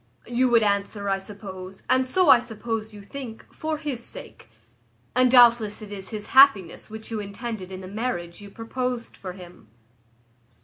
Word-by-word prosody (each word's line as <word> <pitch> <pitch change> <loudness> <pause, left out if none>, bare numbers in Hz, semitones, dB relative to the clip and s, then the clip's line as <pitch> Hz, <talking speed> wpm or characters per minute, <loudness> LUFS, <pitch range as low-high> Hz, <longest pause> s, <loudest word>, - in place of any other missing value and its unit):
You 245 +2 +1
would 230 -2 +5
answer, 200 0 0
I 195 0 +1
suppose, 190 -2 -9
and 260 0 +3
so 360 +4 +3
I 245 - +8
suppose 225 -2 -4
you 205 -1 -11
think, 235 +1 -8
for 315 0 -3
his 285 -6 -4
sake; - - -8 0.7
and 255 0 +5
doubtless 235 -4 +6
it 210 - -10
is 195 -2 -7
his 215 -2 -6
happiness 265 -11 +5
which 220 +1 -8
you 220 - -2
intended 200 -1 -6
in 185 0 -7
the 185 - -8
marriage 195 -5 -4
you 205 - -10
proposed 240 +2 -4
for 185 -2 -7
him. 180 - -13
220 Hz, 170 wpm, -25 LUFS, 200-245 Hz, 0.7 s, I